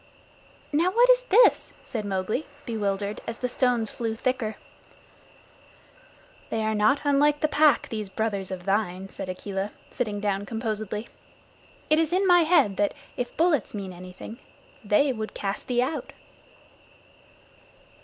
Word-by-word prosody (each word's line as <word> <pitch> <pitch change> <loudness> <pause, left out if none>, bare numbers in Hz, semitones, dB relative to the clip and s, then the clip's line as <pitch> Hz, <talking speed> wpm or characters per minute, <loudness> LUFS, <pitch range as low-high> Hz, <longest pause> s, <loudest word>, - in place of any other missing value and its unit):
"Now 330 +5 +3
what 480 +5 +5
is - - +3
this?" 475 +2 +4
said 220 -4 -4
Mowgli, 200 +8 -2 0.2
bewildered, 205 -3 -2
as 230 - -4
the 250 - -1
stones 245 -3 +1
flew 225 -2 -3
thicker. 235 -2 -1 1.9
"They 225 -1 -1
are 220 0 0
not 215 +7 +3
unlike 290 +1 +3
the 305 - +3
Pack, 300 -3 +4
these 215 -3 -4
brothers 200 -2 -2
of 180 -1 -6
thine," 195 -2 -1
said 185 - -7
Akela, 195 +2 -3 0.2
sitting 210 -4 -2
down 205 -1 -1
composedly. 215 -1 -3 0.8
"It 310 +1 +4
is 325 -1 +1
in 380 +2 +2
my 355 -2 +6
head 310 - +3
that, 205 0 +1 0.2
if 245 - -4
bullets 315 - +2
mean 195 -2 -5
anything, 185 +5 -10 0.4
they 240 +7 +3
would 220 -2 -6
cast 195 0 -3
thee 245 -1 +2
out." 300 +5 -4
220 Hz, 140 wpm, -26 LUFS, 205-285 Hz, 1.9 s, my